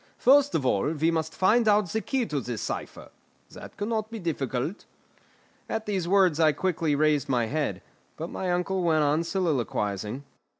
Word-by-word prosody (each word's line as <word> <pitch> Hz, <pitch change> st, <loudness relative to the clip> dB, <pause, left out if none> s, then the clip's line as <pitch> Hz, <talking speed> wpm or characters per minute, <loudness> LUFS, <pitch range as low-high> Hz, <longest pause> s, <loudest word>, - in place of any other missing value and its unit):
"First 285 Hz, +2 st, +4 dB
of 140 Hz, -, 0 dB
all 125 Hz, +4 st, +1 dB
we 160 Hz, +2 st, +2 dB
must 160 Hz, -1 st, -2 dB
find 220 Hz, +5 st, +3 dB
out 210 Hz, -3 st, +3 dB
the 220 Hz, +5 st, -1 dB
key 265 Hz, 0 st, -1 dB
to 150 Hz, -8 st, -2 dB
this 120 Hz, -3 st, -5 dB
cipher; -, -, -6 dB, 0.4 s
that -, -, -11 dB
cannot 215 Hz, +1 st, -2 dB
be 230 Hz, -, -6 dB
difficult." 150 Hz, -, -3 dB, 0.8 s
At 220 Hz, 0 st, -3 dB
these 190 Hz, -5 st, -2 dB
words 185 Hz, -4 st, +3 dB
I 155 Hz, -2 st, +5 dB
quickly 165 Hz, -2 st, 0 dB
raised 150 Hz, -2 st, +1 dB
my 120 Hz, -3 st, +2 dB
head; 145 Hz, +5 st, -2 dB, 0.3 s
but 165 Hz, +2 st, -5 dB
my 185 Hz, -, -3 dB
uncle 180 Hz, +2 st, 0 dB
went 160 Hz, -3 st, +2 dB
on 150 Hz, +3 st, +2 dB
soliloquising. 130 Hz, -, -2 dB
165 Hz, 170 wpm, -26 LUFS, 145-200 Hz, 0.8 s, I